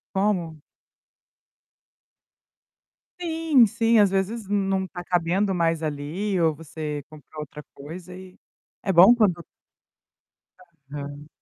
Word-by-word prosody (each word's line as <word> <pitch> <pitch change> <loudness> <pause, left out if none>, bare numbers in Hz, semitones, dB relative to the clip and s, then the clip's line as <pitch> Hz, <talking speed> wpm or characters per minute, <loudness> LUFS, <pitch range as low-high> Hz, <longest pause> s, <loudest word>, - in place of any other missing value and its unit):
Como? 190 -5 0 2.7
Sim, 320 -6 +3
sim, 230 +1 +2
às 205 -2 +5
vezes, 195 +4 -2
não 195 -2 0
tá 180 -1 -8
cabendo 180 +3 0
mais 165 -1 +1
ali 160 +7 -2
ou 160 -2 +3
você 150 -1 -6
compra 155 0 -13
outra 150 0 -8
coisa 170 +6 -10
e, 185 0 -12 0.5
é 195 - +1
bom 190 +7 +8
quando 180 -7 +1 1.5
Aham. 145 0 -7
180 Hz, 105 wpm, -24 LUFS, 155-205 Hz, 2.7 s, bom